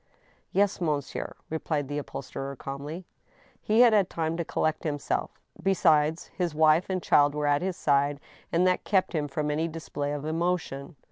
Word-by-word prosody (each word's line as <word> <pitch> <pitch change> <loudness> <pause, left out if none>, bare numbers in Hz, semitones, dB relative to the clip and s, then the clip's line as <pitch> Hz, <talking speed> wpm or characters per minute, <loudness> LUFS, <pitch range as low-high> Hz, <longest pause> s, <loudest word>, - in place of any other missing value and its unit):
" - - -35
Yes, 200 -1 +1
monsieur," 150 -5 -2 0.2
replied 155 -3 -1
the 145 +1 -2
upholsterer, 140 -1 -6
calmly. 145 +7 -6 0.6
He 220 +3 +3
had 240 -2 +7
had 200 -4 +3
time 160 0 -2
to 170 - -1
collect 155 -1 -1
himself. 145 -3 -2 0.2
Besides, 160 -4 +2
his 175 -5 -1
wife 155 +4 +4
and 185 -1 -1
child 145 0 +4
were 150 0 -1
at 145 0 +3
his 185 -1 -2
side, 140 0 +2 0.3
and 170 +2 +3
that 185 0 +2
kept 190 -3 +1
him 150 -3 0
from 150 +1 -2
any 160 +3 0
display 150 -3 -4
of 145 0 -4
emotion. 160 -3 -2
155 Hz, 175 wpm, -27 LUFS, 145-175 Hz, 0.6 s, had